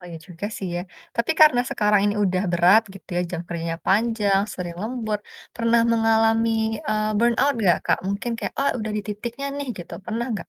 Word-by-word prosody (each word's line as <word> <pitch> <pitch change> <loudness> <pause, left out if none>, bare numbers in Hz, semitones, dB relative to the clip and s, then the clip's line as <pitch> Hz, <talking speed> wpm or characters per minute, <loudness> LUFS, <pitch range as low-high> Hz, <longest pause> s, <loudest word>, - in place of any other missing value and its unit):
Oh - - -14
iya 165 - -7
juga 180 +4 -5
sih 190 - -4
ya, 175 - -2 0.4
tapi 235 +7 +1
karena 300 -6 +7
sekarang 210 -1 +3
ini 205 0 +1
udah 185 -1 +1
berat 180 +6 +6
gitu 195 - -14
ya - - +2
jam 175 - -3
kerjanya 165 -1 -3
panjang 205 -1 +2
sering 175 -2 -6
lembur, 220 -2 -2 0.4
pernah 230 0 +3
mengalami, 225 0 +3 0.4
eee, 215 0 0
burnout 240 +5 +3
gak - - +4
Kak? - - +2
Mungkin 200 +4 -2
kayak - - -4
"Oh 280 - +3
udah 220 0 -3
di 210 - 0
titiknya 235 +6 -5
nih," 285 - -4
gitu 175 - -9
pernah 230 +2 -3
nggak? 210 - -5
215 Hz, 195 wpm, -23 LUFS, 195-230 Hz, 0.4 s, karena